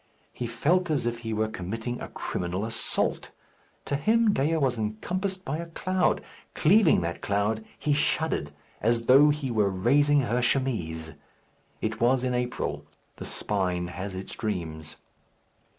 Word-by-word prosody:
He 120 - -4
felt 165 +10 +1
as 150 -6 0
if 120 0 -1
he 115 -1 -5
were 110 0 0
committing 110 +4 -5
a - - -5
criminal 90 +4 -3
assault. 115 - +1 0.6
To 140 - -1
him 220 +8 +3
Dea 155 +2 +1
was 135 -5 +1
encompassed 185 - -3
by 150 +4 -2
a 170 0 -6
cloud. 185 +2 0 0.3
Cleaving 175 - +5
that 85 +1 -3
cloud, 105 +2 0
he 150 - +1
shuddered, 150 - 0 0.3
as 115 +1 +2
though 135 +5 +7
he 145 -3 -1
were 105 -3 +2
raising 140 +9 +3
her 125 -1 0
chemise. 90 -12 -1 0.7
It 110 +1 -3
was 125 +2 +3
in 125 -1 0
April. 125 0 -2 0.3
The - - -7
spine 90 -4 -1
has 95 +2 -5
its 95 +1 -6
dreams. 80 -8 -4
120 Hz, 150 wpm, -27 LUFS, 100-145 Hz, 0.7 s, though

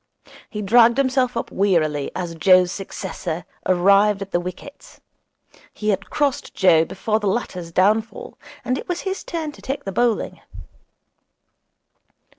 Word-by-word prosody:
He 210 -1 -5
dragged 235 +4 +5
himself 260 -2 +1
up - - -4
wearily 155 -7 +1
as 175 -2 -4
Joe's 180 +2 +4
successor 180 -3 -5 0.2
arrived 195 +2 +4
at 195 - -14
the 175 - +1
wickets. 180 - -10 0.8
He 215 - -2
had 195 -1 -1
crossed 285 -3 -1
Joe 165 -4 +4
before 215 +5 -2
the 210 - -2
latter's 180 -5 -3
downfall, 215 +6 0 0.3
and 255 +2 0
it - - -9
was 355 - -2
his 385 0 -4
turn 320 -3 -4
to - - -16
take 270 +2 -4
the 195 - -3
bowling. 240 +2 0
200 Hz, 140 wpm, -21 LUFS, 180-240 Hz, 0.8 s, dragged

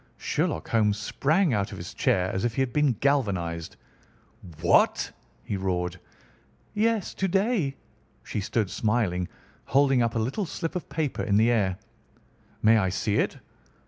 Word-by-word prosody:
Sherlock 80 - -1
Holmes 105 -3 +2
sprang 155 - +1
out 100 -2 0
of - - -7
his - - -7
chair 95 0 +1
as 95 - -1
if 120 -1 -1
he - - +1
had 125 -2 -4
been 150 -3 +3
galvanised. 95 - -1 0.9
"What!" 85 - +3 0.3
he 105 - -3
roared. 90 -1 -2 0.7
"Yes, 220 -1 +1
to 190 - -1
day." 195 - +1 0.5
She 105 - -3
stood 105 -1 -1
smiling, 100 -4 0 0.4
holding 135 -2 +3
up 115 0 0
a - - +1
little 130 - -1
slip 165 +2 -4
of 180 - -4
paper 155 -4 -2
in 100 -3 +2
the 115 +3 +4
air. 95 -5 +1 0.9
"May 110 +1 +6
I 95 -2 +1
see 100 +3 0
it?" - - 0
115 Hz, 155 wpm, -26 LUFS, 95-140 Hz, 0.9 s, May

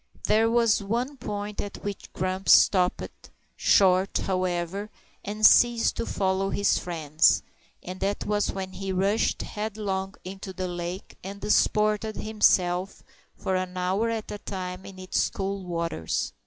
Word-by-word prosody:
There 225 +1 +3
was 230 -3 +3
one 240 +8 -2
point 205 -2 -4
at 205 - -8
which 205 -1 -6
Grumps 185 +1 +2
stopped 180 -2 +2 0.3
short, 190 0 +3
however, 185 +1 -2 0.3
and 210 +1 0
ceased 235 +1 +5
to - - -3
follow 190 0 0
his 200 - +2
friend, 160 -3 -7 0.6
and 185 +1 -7
that 200 +1 -2
was 210 0 0
when 190 -1 -5
he 195 0 -5
rushed 195 +4 +1
headlong 205 -2 -4
into 190 +1 -7
the 185 0 -3
lake 175 +1 -6
and 200 +2 -7
disported 210 +1 +1
himself 190 -3 +1 0.3
for 190 - -2
an 185 0 -3
hour 190 +5 0
at 225 -2 -4
a 205 - -6
time 185 -2 -6
in 195 - -11
its 185 0 0
cool 195 0 -4
waters. 170 - -2
195 Hz, 140 wpm, -26 LUFS, 185-210 Hz, 0.6 s, ceased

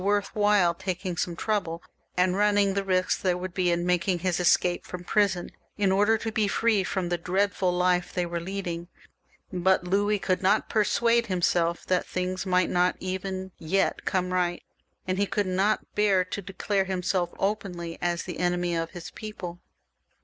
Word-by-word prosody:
393 205 +2 +3
worth 205 - -6
while 185 -5 +4
taking 185 0 -4
some 170 +1 -2
trouble, 175 -4 -2 0.3
and 180 0 +3
running 205 -1 +3
the 200 0 0
risk 185 -1 +1
there 180 -2 +1
would 180 0 -5
be 180 -1 +1
in 175 0 +1
making 180 +1 +1
his 180 0 -1
escape 175 0 +3
from 180 -1 -7
prison, 190 -2 +1 0.3
in 200 -2 +2
order 205 +3 +4
to 225 +1 -4
be 215 -2 +1
free 215 0 +2
from 185 -1 -2
the 175 -1 -1
dreadful 185 +1 +1
life 180 0 +1
they 180 - -1
were 170 0 -3
leading; 175 -1 -4 0.7
but 185 +1 +2
Louis 205 +3 +1
could 185 -2 -1
not 200 +3 +2
persuade 230 +2 +2
himself 175 -2 +1
that 185 -1 0
things 185 +1 -3
might 180 -1 +2
not 180 +1 +2
even 190 0 -4
yet 190 +5 0
come 185 -1 -1
right, 175 -1 0 0.4
and 185 +1 -1
he 200 - +2
could 205 0 0
not 190 +3 0
bear 200 -3 +3
to 195 +2 -5
declare 195 +1 -1
him 185 -1 -3
self 175 -1 0
openly 190 -5 -3
as 175 -1 0
the 180 -3 -6
enemy 175 -1 0
of 165 0 -2
his 175 -1 -9
people. 190 -5 -7
185 Hz, 180 wpm, -27 LUFS, 175-200 Hz, 0.7 s, while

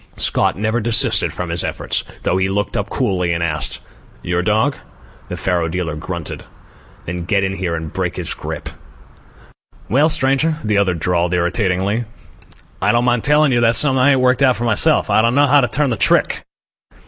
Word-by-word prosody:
Scott - - 0
never 110 +3 -1
desisted 115 0 +2
from 90 -2 -5
his 85 0 0
efforts, - - -3 0.2
though 90 - 0
he 95 0 0
looked 100 +1 -2
up 100 - -2
coolly 95 -9 -1
and 85 0 -2
asked: 75 -3 -3 0.4
"Your 85 0 -1
dog?" 110 +9 +1 0.5
The 90 - -5
faro 90 -2 -1
dealer 80 -2 -3
grunted. 85 +1 -6 0.6
"Then 85 +1 -5
get 100 +1 +1
in 95 0 -1
here 90 -3 -3
and 80 -2 -6
break - - -2
this - - -4
grip." - - -7 1.2
"Well, 145 +8 +3
stranger," 150 +2 +2
the 105 -1 +1
other 95 -3 +1
drawled 85 +1 0
irritatingly, 95 +5 -1 0.8
"I - - +3
don't 120 +1 +1
mind 120 -2 +1
telling 150 0 +3
you 120 -1 +2
that's 115 0 +3
something 135 -3 +4
I 140 +2 +4
ain't 130 - +1
worked 125 +1 +2
out 130 -2 +4
for 120 - -5
myself. 110 -4 +3
I - - +4
don't 115 +2 +1
know 145 +1 +5
how 145 +1 +4
to 125 - +1
turn 135 +2 0
the 115 - -2
trick." - - +1
105 Hz, 190 wpm, -18 LUFS, 90-125 Hz, 1.2 s, know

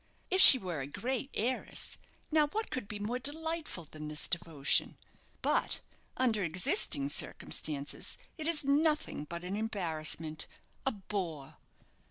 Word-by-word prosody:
If 375 +1 +3
she 270 - +14
were 180 - -5
a 135 - -6
great 255 - -4
heiress, 250 +4 -2 0.3
now, 305 -1 +3
what 440 +9 -5
could 255 -6 -5
be 210 - -6
more 220 +5 -4
delightful 315 - -3
than 155 0 -10
this 150 0 -3
devotion? 165 -5 0 0.5
But, - - 0 0.4
under 225 -6 0
existing 160 -4 0
circumstances, 145 0 -4 0.2
it 315 -1 -4
is 330 -3 +2
nothing 300 - 0
but 170 +3 -8
an 185 +2 -5
embarrassment 160 -7 -1 0.4
a - - +3
bore. 175 - -6
200 Hz, 135 wpm, -31 LUFS, -, 0.5 s, she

